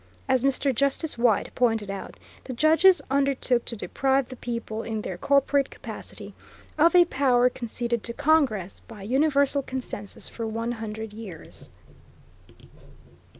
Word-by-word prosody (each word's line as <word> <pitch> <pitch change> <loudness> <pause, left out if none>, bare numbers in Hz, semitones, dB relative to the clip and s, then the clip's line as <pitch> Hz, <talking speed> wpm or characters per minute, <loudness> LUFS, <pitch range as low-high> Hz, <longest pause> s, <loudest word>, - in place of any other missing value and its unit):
As 260 -2 +2
Mr. 275 0 +1
Justice 280 +5 0
White 235 -3 +1
pointed 225 -5 +1
out, 195 - -7 0.3
the 260 - -5
judges 320 +7 +4
undertook 275 -3 +1
to 235 - -4
deprive 265 +7 0
the 255 - -8
people, 230 -2 -5
in 220 -2 -4
their 185 - -4
corporate 280 +6 +2
capacity, - - -10 0.4
of 330 +3 +4
a 350 -1 +8
power 250 -5 +2
conceded 235 -1 -3
to 235 - -5
Congress 275 - +1
"by 210 -4 -11
universal 280 +4 +2
consensus 255 -6 -6
for 230 -1 -5
one 230 +2 -3
hundred 220 -2 -6
years." 205 -7 -10
245 Hz, 135 wpm, -25 LUFS, 225-280 Hz, 0.4 s, a